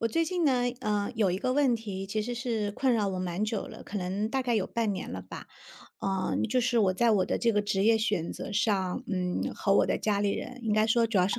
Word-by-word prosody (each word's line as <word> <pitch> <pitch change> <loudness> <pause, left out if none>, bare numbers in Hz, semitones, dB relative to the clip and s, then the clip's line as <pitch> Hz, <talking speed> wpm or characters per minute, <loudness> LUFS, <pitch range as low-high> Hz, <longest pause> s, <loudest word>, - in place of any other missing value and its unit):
我 230 - +1
最 330 +8 +1
近 355 0 -1
呢， 255 -4 +3 0.2
呃， 210 +1 -1
有 215 -4 +2
一 180 - -1
个 255 - 0
问 270 -3 +3
题 195 -4 -6
其 215 +2 -1
实 245 +3 -3
是 230 -4 -2
困 255 +3 +1
扰 210 -3 +1
我 190 -1 -3
蛮 185 +3 -2
久 215 -1 -2
了， - - -10
可 205 - -5
能 190 +4 -2
大 265 +1 0
概 245 -2 0
有 205 -4 +1
半 230 -3 -1
年 185 - -5
了 - - -5
吧。 - - -9 0.5
呃， 190 -1 -1
就 250 +3 +2
是 240 0 +1
我 190 -4 +3
在 235 +5 +3
我 200 -4 +3
的 - - 0
这 235 -1 +2
个 210 - +2
职 200 -1 0
业 225 0 +5
选 205 -6 -1
择 - - -6
上， 200 -3 0
嗯， 180 -2 -2
和 195 - +1
我 - - +4
的 - - 0
家 205 -2 0
里 205 -1 +2
人， 255 +4 -5
应 220 - +1
该 215 +1 +3
说 230 +1 +3
主 220 -3 +1
要 180 +1 +3
是 235 - -1
215 Hz, 290 characters per minute, -29 LUFS, 195-235 Hz, 0.5 s, 业